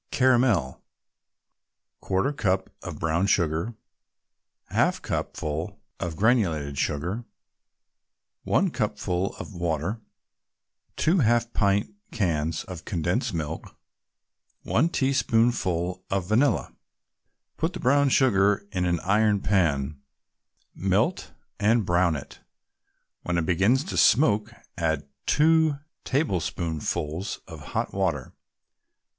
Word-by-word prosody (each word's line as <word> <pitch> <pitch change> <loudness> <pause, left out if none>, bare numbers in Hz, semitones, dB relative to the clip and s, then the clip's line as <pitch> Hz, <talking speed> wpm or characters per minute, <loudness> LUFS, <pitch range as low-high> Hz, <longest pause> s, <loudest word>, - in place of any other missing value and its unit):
CARAMEL 120 - +2 1.2
1/4 110 +10 0
cupful 95 -5 0
of 85 -5 -7
brown 85 +4 0
sugar 85 +5 +1 1.0
1/2 - - +2
cupful 75 +1 -3 0.2
of 85 -2 -3
granulated 85 - +1
sugar 90 +11 -2 1.2
1 190 -2 +2
cupful 105 -6 -2
of - - -8
water 85 +5 -2 0.9
2 170 +4 +2
half 120 -2 +2
pint 100 - +1 0.2
cans 80 -6 -1
of 90 -3 -9
condensed 100 - -1
milk 80 0 -5 0.9
1 150 +9 +2
teaspoonful 115 - +1
of 95 -2 -1
vanilla 115 +9 +1 0.8
Put 160 +3 -1
the 180 - -6
brown 140 +2 +3
sugar 105 -6 +3
in 90 -2 -1
an 85 -1 +1
iron 105 +1 +3
pan, 75 -7 +1 0.7
melt - - 0 0.3
and 110 +1 +3
brown 85 -1 +2
it. 70 - -9 0.8
When 90 -1 -2
it 85 - 0
begins 100 - +3
to 185 - -5
smoke, 110 -5 +4 0.3
add 80 -4 0 0.2
two 160 -1 +4 0.3
tablespoonfuls 85 - -2
of - - -9 0.2
hot - - -1
water. 85 -9 -1
95 Hz, 100 wpm, -26 LUFS, 85-120 Hz, 1.2 s, smoke